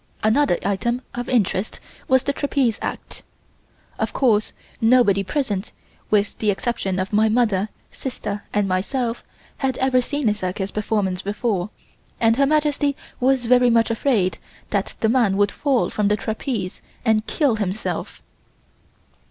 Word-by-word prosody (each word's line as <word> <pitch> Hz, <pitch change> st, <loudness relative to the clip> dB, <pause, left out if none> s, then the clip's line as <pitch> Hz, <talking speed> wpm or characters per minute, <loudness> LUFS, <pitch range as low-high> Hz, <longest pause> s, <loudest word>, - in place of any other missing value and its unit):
Another 220 Hz, -1 st, +3 dB
item 235 Hz, +5 st, 0 dB
of 245 Hz, 0 st, -4 dB
interest 215 Hz, -4 st, 0 dB, 0.3 s
was 260 Hz, 0 st, +4 dB
the 280 Hz, -, 0 dB
trapeze 270 Hz, -6 st, 0 dB
act. -, -, -5 dB, 0.8 s
Of -, -, -1 dB
course 220 Hz, -6 st, +2 dB, 0.3 s
nobody 225 Hz, -4 st, +4 dB
present 210 Hz, -3 st, -2 dB, 0.4 s
with 205 Hz, -1 st, +2 dB
the 215 Hz, -, +1 dB
exception 195 Hz, -2 st, -1 dB
of 190 Hz, +2 st, -3 dB
my 220 Hz, +1 st, +4 dB
mother, 215 Hz, -3 st, +2 dB, 0.2 s
sister 210 Hz, -6 st, -5 dB
and 205 Hz, -1 st, +1 dB
myself 230 Hz, +6 st, -1 dB, 0.3 s
had 265 Hz, -2 st, -1 dB
ever 260 Hz, -1 st, +3 dB
seen 285 Hz, 0 st, -2 dB
a 210 Hz, -, +4 dB
circus 190 Hz, -1 st, -3 dB
performance 205 Hz, -3 st, -1 dB
before, 205 Hz, -2 st, -1 dB, 0.5 s
and 225 Hz, 0 st, +4 dB
Her 275 Hz, +2 st, +3 dB
Majesty 295 Hz, -1 st, +1 dB, 0.2 s
was 255 Hz, -1 st, +2 dB
very 250 Hz, +1 st, +5 dB
much 230 Hz, 0 st, +3 dB
afraid 215 Hz, -7 st, +1 dB, 0.3 s
that 200 Hz, -2 st, -1 dB
the 220 Hz, -, +3 dB
man 225 Hz, -5 st, +3 dB
would 205 Hz, 0 st, +3 dB
fall 275 Hz, -4 st, +1 dB
from 210 Hz, -1 st, +1 dB
the 210 Hz, +1 st, +2 dB
trapeze 215 Hz, -3 st, -3 dB, 0.2 s
and 220 Hz, -1 st, +2 dB
kill 280 Hz, -8 st, +1 dB
himself. 205 Hz, +1 st, -3 dB
220 Hz, 145 wpm, -22 LUFS, 200-255 Hz, 0.8 s, very